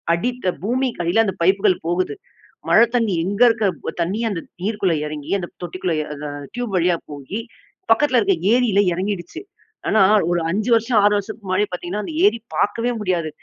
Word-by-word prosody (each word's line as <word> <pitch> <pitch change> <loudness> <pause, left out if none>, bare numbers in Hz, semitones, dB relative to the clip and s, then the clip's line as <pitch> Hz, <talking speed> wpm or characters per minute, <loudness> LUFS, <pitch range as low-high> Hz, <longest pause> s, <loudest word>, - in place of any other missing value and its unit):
அடித்த 245 +1 -1
பூமிக்கு 250 -1 -1
அடில 185 +7 +3
அந்த 190 -3 -2
பைப்புகள் 190 +1 +3
போகுது. 180 - -1 0.5
மழை 230 - +7
தண்ணீ 225 -5 +1
எங்க 200 +4 -3
இருக்குற 220 -4 -1
தண்ணீ. 185 +6 -1
அந்த 185 - -3 0.2
நீர் 210 +3 -2
குள்ள 185 -3 +3
எறங்கி 150 -1 -6
அந்த 175 - -6
தொட்டிக்குள்ள 175 -1 -2 0.3
அ - - -4 0.2
டியூப் 245 -4 -4
வழியா 175 0 +2
போயி 145 +9 -6 0.5
பக்கத்துல 255 +2 +4
இருக்கிற 195 -4 +2 0.2
ஏரில 240 -5 +3
எறங்கிடுச்சு. 185 - -4 0.5
ஆனா 215 - +3 0.3
ஒரு 175 - +2
5 210 +6 -1
வருஷம், 230 +1 +1
6 205 0 +5
வருஷத்துக்கு 205 0 -6
முன்னாடி 190 +3 +2
பார்த்தீங்கன்னா, 180 +3 -4
அந்த - - -6
ஏரி 235 - +3 0.2
பார்க்கவே 230 +4 0
முடியாது. 175 -5 -1
200 Hz, 165 wpm, -21 LUFS, 180-225 Hz, 0.5 s, மழை